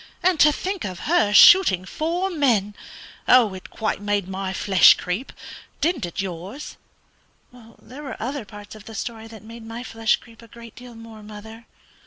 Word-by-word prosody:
And 360 -3 +2
to 300 - +6
think 380 +5 -4
of 185 -3 -6
her 310 -11 +1
shooting 205 - +6
four 345 - -3
men! 235 - +1 0.5
It 210 -7 +3
quite 215 -2 -3
made 205 -2 -1
my 190 0 -4
flesh 190 0 +5
creep; 185 +9 -5 0.5
didn't 300 - -1
it 170 - -9
yours?" 190 - -8 0.8
"There 245 +3 -14
were 280 -3 -7
other 260 +3 -4
parts 205 0 -12
of 215 -1 -14
the 225 - -10
story 225 +1 -6
that 220 -1 -13
made 230 +1 -12
my 225 +2 -8
flesh 225 -2 0
creep 230 -1 -18
a 230 - -15
great 235 0 -14
deal 245 -1 -13
more, 225 -1 -12
mother." 220 +2 -12
225 Hz, 170 wpm, -22 LUFS, 205-255 Hz, 0.8 s, to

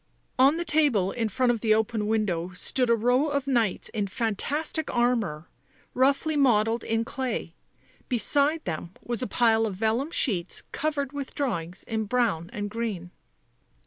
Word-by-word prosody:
On 275 +5 +5
the 345 - -3
table 290 - +2
in 230 -2 -2
front 250 +4 +2
of 230 -3 -3
the 215 -2 +4
open 220 -1 -1
window 195 -6 0
stood 250 +7 +1
a 235 - +5
row 245 +6 +2
of 285 -2 -1
knights 235 -8 +1
in 210 -3 -2
fantastic 265 - -1
armour, 230 -11 0 0.5
roughly 280 +4 +2
modelled 230 -4 +3
in 225 0 -1
clay; 245 -10 -3 0.6
beside 285 +6 +1
them 170 +1 -4
was 240 0 0
a 250 - -1
pile 225 -2 +3
of 200 - -5
vellum 225 +8 0
sheets 195 - -1
covered 290 -2 -2
with 280 -2 -6
drawings 185 - -2
in 220 -2 -2
brown 205 -8 0
and 205 0 -4
green. 210 -6 -4
230 Hz, 155 wpm, -26 LUFS, 210-270 Hz, 0.6 s, On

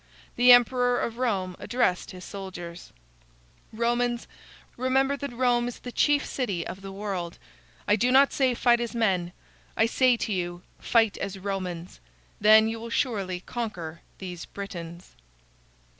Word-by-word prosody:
The 245 +1 +7
emperor 245 0 +5
of 230 +1 -3
Rome 190 -7 -1
addressed 235 -6 0
his 185 0 -10
soldiers: 180 -3 -8 0.8
"Romans, 240 +1 0 0.5
remember 265 +2 +1
that 280 -1 -5
Rome 240 0 +1
is 245 - -6
the 245 - -8
chief 290 +3 +2
city 200 -11 -2
of 195 - -7
the 195 0 -8
world. 195 -4 -4 0.5
I 205 - +5
do 245 +4 +1
not 275 +2 +5
say 260 -3 +2
fight 240 0 +3
as 235 0 -4
men; 185 -6 +1 0.5
I 225 - +4
say 250 +1 +3
to 220 - -2
you, 175 -1 -3 0.2
fight 225 -3 +2
as 195 0 -4
Romans. 185 -3 -5 0.4
Then 215 +1 +7
you 225 0 -3
will 230 +1 -7
surely 200 -8 -1
conquer 180 -9 -5 0.2
these 180 -3 -7
Britains." 175 - -8
220 Hz, 145 wpm, -26 LUFS, 185-245 Hz, 0.8 s, The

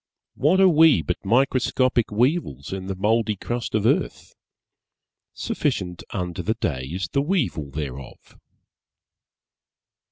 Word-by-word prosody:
What 190 - +2
are 190 - +7
we 160 - +5
but - - -3
microscopic 130 +1 +2
weevils 110 - 0
in 95 -1 -5
the 95 - -3
mouldy 110 +2 +1
crust 120 +3 -4
of 110 -1 +1
earth? - - 0 1.0
Sufficient 90 -1 -2
unto 90 -3 -4
the 110 - -1
day 75 - -2
is 85 +4 -4
the 140 - +1
weevil 140 - -1
thereof. 70 -2 -8
105 Hz, 120 wpm, -23 LUFS, 85-130 Hz, 1.0 s, are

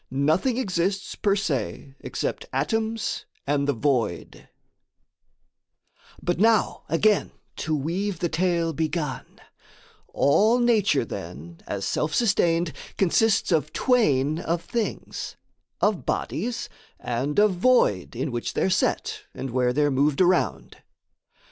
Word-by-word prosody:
NOTHING 155 - +1
EXISTS 190 -4 -1
per 200 -2 +1
se 135 - -3
EXCEPT - - -4
ATOMS 225 -1 -1 0.2
AND 140 0 0
THE 145 - +2
VOID 120 - -1 1.7
But, 175 0 -1
now 220 +1 +2
again 205 +5 +2 0.2
to 155 0 -1
weave 175 +7 -2
the 175 - 0
tale 170 0 0
begun, 155 -2 -3 0.7
All 215 - +3
nature, 220 - +3
then, 85 -3 -8
as 100 -1 -3
self 155 0 -1
sustained, 175 -7 +2 0.2
consists 200 +2 +2
Of 155 -2 +1
twain 155 - +2
of 170 0 -2
things: 230 -2 -4 0.5
of - - +1
bodies 240 0 -2 0.3
and 130 +5 -2
of 210 -1 +5
void 180 - +2
In 130 +4 -2
which 120 -1 -3
they're 190 - +1
set, 185 - 0
and 135 -1 -5
where 125 0 +2
they're 145 +2 +2
moved 140 +2 +2
around. 185 0 +1
165 Hz, 115 wpm, -25 LUFS, 140-205 Hz, 1.7 s, of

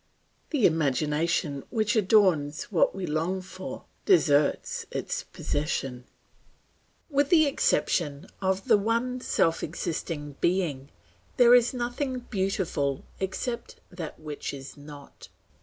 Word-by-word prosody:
The 285 -8 +2
imagination 150 -1 +1
which 215 -2 0
adorns 185 -8 +3
what 175 -1 +3
we 190 -1 -3
long 165 +4 -1
for, 185 0 -8 0.2
deserts 150 - +3
its - - -3
possession. 135 -4 -3 1.1
With 285 0 +2
the 320 -3 +6
exception 165 - +1 0.2
of 190 +3 0
the 220 -4 +6
one 235 +4 0
self 165 -8 +1
existing 150 -3 -4
Being, 165 -7 0 0.5
there 245 -1 +7
is 245 -1 +6
nothing 250 +1 -3
beautiful 190 - -1
except 215 +5 -3 0.2
that 175 -4 -7
which 150 -2 -5
is 135 0 -9
not. 145 -1 -12
180 Hz, 110 wpm, -27 LUFS, 150-225 Hz, 1.1 s, there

